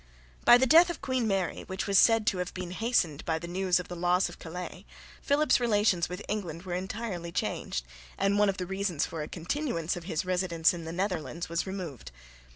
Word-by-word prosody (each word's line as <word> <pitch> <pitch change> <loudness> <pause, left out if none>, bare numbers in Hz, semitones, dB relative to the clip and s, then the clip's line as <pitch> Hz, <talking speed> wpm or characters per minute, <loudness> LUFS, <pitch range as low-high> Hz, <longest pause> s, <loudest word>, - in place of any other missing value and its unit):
By 240 - +9
the 260 - +3
death 330 +6 +7
of 345 - -4
Queen 255 -3 0
Mary, 195 -4 -1
which 190 +1 -3
was 195 -1 +4
said 225 -2 +5
to 190 -3 +1
have 180 0 -4
been 180 -1 -5
hastened 185 - 0
by 160 -1 0
the 170 +2 -7
news 185 +1 +1
of 180 - -6
the 175 - -6
loss 180 +2 +2
of - - -12
Calais, 180 +2 -7 0.4
Philip's 290 0 +3
relations 205 -7 +2
with 180 +3 -6
England 180 -6 -4
were 180 -2 -5
entirely 185 -2 -4
changed, - - -2 0.3
and 195 +1 +2
one 210 -1 +4
of 195 - -2
the 180 - -3
reasons 190 -4 -1
for 165 -2 -5
a 150 - -4
continuance 175 - -2
of 175 -2 -8
his 175 -1 -2
residence 180 -3 +2
in 170 -2 -6
the 165 - -5
Netherlands 175 -3 -3
was 170 +3 -1
removed. 180 - -6
185 Hz, 210 wpm, -29 LUFS, 170-205 Hz, 0.4 s, By